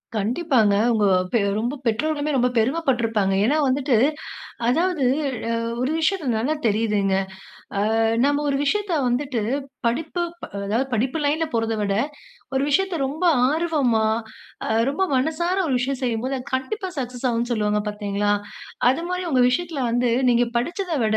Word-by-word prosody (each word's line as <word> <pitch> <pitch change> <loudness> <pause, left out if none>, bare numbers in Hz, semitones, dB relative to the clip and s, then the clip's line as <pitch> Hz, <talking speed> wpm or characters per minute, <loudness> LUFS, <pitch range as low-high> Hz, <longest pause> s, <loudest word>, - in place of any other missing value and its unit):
கண்டிப்பாங்க. 225 - +2 0.2
உங்க 215 -2 +2 0.3
பெ 235 - +4 0.2
ரொம்ப 240 +5 -2
பெற்றோர்களுமே 295 +6 0
ரொம்ப 250 0 +3
பெருமை 260 +9 +2
பட்ருப்பாங்க. 225 -6 +1
ஏன்னா 285 +7 +2
வந்துட்டு, 260 -1 +1 0.7
அதாவது 330 +2 +1 0.5
அ - - +1 0.3
ஒரு 255 +3 0
விஷயத்த 330 -1 0
நல்லா 265 +8 0
தெரியுதுங்க. 210 -2 +1 0.6
ஆ - - +1 0.4
நம்ம 290 +1 +1
ஒரு 275 - +1
விஷயத்த 410 +5 0 0.2
வந்துட்டு, 250 -2 -1 0.4
படிப்பு 315 +8 -1 0.2
ப - - -3 0.2
அதாவது 230 +7 0
படிப்பு 255 +7 0
லைன்ல 315 +3 +1
போறத 225 -1 0
விட, 200 -1 0 0.6
ஒரு 265 - +2
விஷயத்த 385 +5 +1
ரொம்ப 310 +7 -4 0.2
ஆர்வமா, 295 -8 +1 0.6
அ - - -3 0.2
ரொம்ப 290 +7 -2
மனசார 320 +7 0
ஒரு 265 - +1
விஷயம் 265 +1 -2
செய்யும் 235 -1 -1
போது, 265 +1 -1
அது 250 - -9
கண்டிப்பா 375 +9 -3
சக்சஸ் 250 0 -3
ஆகும்னு 235 +1 -1
சொல்லுவாங்க 210 -2 0
பார்த்தீங்களா? 205 0 -1 0.6
அது 270 +6 -1
மாரி 365 0 -2
உங்க 255 -2 +4
விஷயத்துல 315 +1 -2
வந்து 245 0 +1 0.2
நீங்க 240 0 +3
படிச்சத 350 +7 -3
விட, 220 0 +2
255 Hz, 150 wpm, -23 LUFS, 225-310 Hz, 0.7 s, பெ